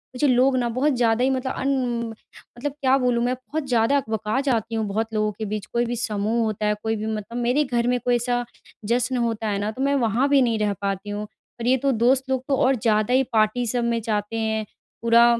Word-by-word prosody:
मुझे 285 +4 +2
लोग 255 +1 +4
ना 240 -1 0
बहुत 265 +5 +1
ज़्यादा 235 0 +2
ही 260 - +3
मतलब 260 0 -1
अन 270 - -2 0.4
म - - -7 0.4
मतलब 285 +4 -3
क्या 265 0 +4
बोलूँ 245 -2 +1
मैं, 250 +1 +1
बहुत 275 +4 -5
ज़्यादा 240 +2 +3
अकबका 220 -2 -1
जाती 230 -5 -1
हूँ 220 -1 0
बहुत 220 +3 -1
लोगों 215 0 +1
के 215 +2 -6
बीच। 210 0 -4
कोई 235 0 +2
भी 240 +1 -2
समूह 220 0 -1
होता 215 -1 -2
है, 210 - +2
कोई 225 0 0
भी 215 0 -4
मतलब 220 +1 -4
मेरे 245 +5 +2
घर 240 -3 0
में 250 0 +2
कोई 245 0 +1
ऐसा 245 0 0 0.4
जश्न 245 +3 0
होता 225 -1 -2
है 200 -1 -1
ना, 205 +1 -1
तो 250 - -7
मैं 280 +1 +2
वहाँ 240 +6 +1
भी 280 -1 +5
नहीं 230 -3 +1
रह 210 -1 +1
पाती 195 0 -3
हूँ। 205 +1 -3 0.4
और 235 - -3
ये 260 +1 +4
तो 275 +2 +1
दोस्त 255 +3 +3
लोग 260 -1 0
तो 275 - +2
और 265 +1 +3
ज़्यादा 215 0 +1
ही 260 +1 +4
पार्टी 220 +3 +2
सब 240 +1 0
में 235 -1 0
जाते 210 0 -2
हैं। 220 -1 -1 0.4
पूरा 230 +1 +6
235 Hz, 240 wpm, -23 LUFS, 220-255 Hz, 0.4 s, पूरा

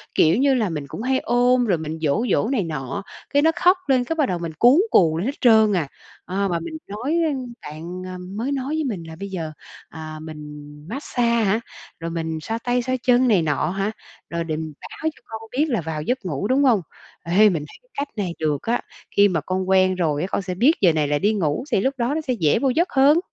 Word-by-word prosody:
Kiểu 160 +4 +4
như 275 +1 +4
là, 225 -6 +1
mình 150 -4 -4
cũng 205 - -7
hay 260 +2 +1
ôm 245 +1 +3
rồi 190 -6 +2
mình 160 0 -5
dỗ 160 +10 +1
dỗ - - +2
này 245 -5 0
nọ, 150 +3 -4 0.3
cái 285 - +3
nó 320 +2 +4
khóc 360 +2 +4
lên 260 -3 +3
cái 325 +6 -3
bắt 305 -3 +2
đầu 180 -2 -1
mình 165 -2 -5
cuống 260 +9 +6
cuồng 160 -3 +5
lên 180 - -2
hết 275 +3 -2
trơn 220 -3 +6
à. 170 -6 0 0.4
À, 195 +2 -1
mà 175 -3 -1
mình 315 - -6
nói 240 +10 -2 0.5
bạn, 165 +5 -7
ờ, 185 0 -6
mới 200 +9 -4
nói 270 -2 -2
với 315 - 0
mình 205 - -3
là 160 - -8
bây 200 0 -5
giờ, 165 -5 -4 0.4
à, 155 -1 -8
mình 155 -1 -8 0.5
massage 250 -1 -3
hả? 225 -3 +2 0.4
Rồi 165 0 -4
mình 160 -1 -3
xoa 225 +7 -3
tay 245 0 +1
xoa 255 +1 -1
chân 250 0 +4
này 205 -7 +4
nọ 150 -1 0
hả? 195 +3 -1 0.4
Rồi 170 0 -2
để 160 -2 -3
báo 155 -2 -8
cho - - -21
con 220 0 -7
biết 280 +5 +2
là 230 -9 0
vào 160 -1 -4
giấc 245 +7 -2
ngủ, 175 +3 -2
đúng 265 +4 +3
hông? 235 -8 +4 0.4
Ê, 195 +6 +5
mình 160 -6 -2
thấy - - -14
cái - - -33
cách 285 +1 -3
này 185 -5 -2
được 150 -3 0
á, 235 +2 0 0.3
khi 200 0 +6
mà 175 -5 -1
con 185 +3 -2
quen 185 -1 +4
rồi 155 -5 0
á, 180 - -1
con - - 0
sẽ 185 -1 -4
biết 250 - +5
giờ 175 -4 +5
này 155 -2 +1
là 145 0 +1
đi 205 +5 +2
ngủ 160 -3 0
thì 195 - +3
lúc 265 - +1
đó 245 +3 0
nó 320 - -1
sẽ 265 -4 -1
dễ 170 -5 +2
vô 270 - +2
giấc 335 +8 +1
hơn. 285 +4 +5
195 Hz, 245 wpm, -22 LUFS, 165-250 Hz, 0.5 s, cuống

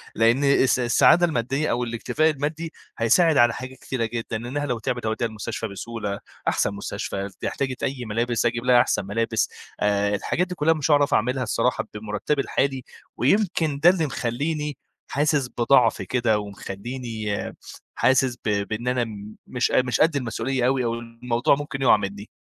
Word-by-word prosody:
لإن 115 +5 +3
الس 135 -2 +4
السعادة 155 +8 +5
المادّية 135 0 -1
أو 120 +1 0
الاكتفاء 120 +7 0
المادّي، 155 +3 -3 0.3
هيساعد 155 +7 +4
على 120 -1 +5
حاجات 130 +1 -8
كتيرة 125 -4 -3
جدًا، 115 0 -4
إنّها 130 +6 -3
لو 125 -4 -2
تِعبِت 120 +1 -3
أودّيها 110 +2 0
المستشفى 110 +1 -5
بسهولة 105 0 -5 0.3
أحسن 100 - +1
مستشفى، 100 0 -4 0.2
احتاجت 130 -2 -3
أي 130 -3 -2
ملابس 115 +2 -1
أجيب 120 +1 0
لها 125 -1 +6
أحسن 95 - 0
ملابس، 110 +2 0 0.3
آآ 100 0 +1
الحاجات 180 - -1
دي 180 - -5
كُلّها 160 +1 +3
مش 155 0 -1
هاعرف 145 -1 +4
أعملها 125 +3 +1
الصراحة 115 +1 0
بمُرتَّبي 105 +7 -2
الحالي 135 -2 -1 0.3
ويمكن 160 - +1
ده 170 +4 +7
اللي 175 -4 +2
مخلّيني 145 +3 -2 0.3
حاسِس 145 -2 +1
بضعف 120 -3 +4
كده 110 +1 +1
ومخلّيني 105 +2 -5 0.6
حاسِس 130 -1 +2
ب - - +1 0.2
بإن 115 +3 -4
أنا 125 -1 +1
م 105 -1 -8
مش 125 -2 0
ق - - +1
مش 125 -1 0
قد 160 -1 +4
المسؤولية 125 0 -1
أوي 130 -1 +1
أو 115 - 0
الموضوع 120 +4 0
ممكن 145 -1 -5
يُقَع 120 -4 +6
منّي. 100 +1 -6
125 Hz, 165 wpm, -24 LUFS, 115-140 Hz, 0.6 s, ده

